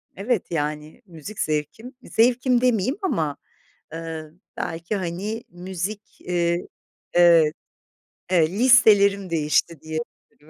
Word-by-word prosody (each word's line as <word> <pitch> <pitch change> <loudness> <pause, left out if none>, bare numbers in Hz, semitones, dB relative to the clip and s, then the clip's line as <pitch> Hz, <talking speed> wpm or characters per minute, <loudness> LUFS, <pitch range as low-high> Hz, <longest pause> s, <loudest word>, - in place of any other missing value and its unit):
evet, 210 0 -2
yani, 150 -1 -3
müzik 180 +3 -10
zevkim, 155 - -3
zevkim 245 +1 +2
demeyeyim 250 - +1
ama, 160 - -1 0.6
ııı, 160 -1 -7 0.2
belki, 170 +4 -3
hani, 195 +5 -4
müzik, 190 +3 -6
eee 175 0 -1 0.5
Evet, 170 -3 +5 0.8
e 170 -4 +4
listelerim 205 -6 +5
değişti 160 0 0
diyebilirim, 155 -1 -8
175 Hz, 95 wpm, -23 LUFS, 160-215 Hz, 0.8 s, Evet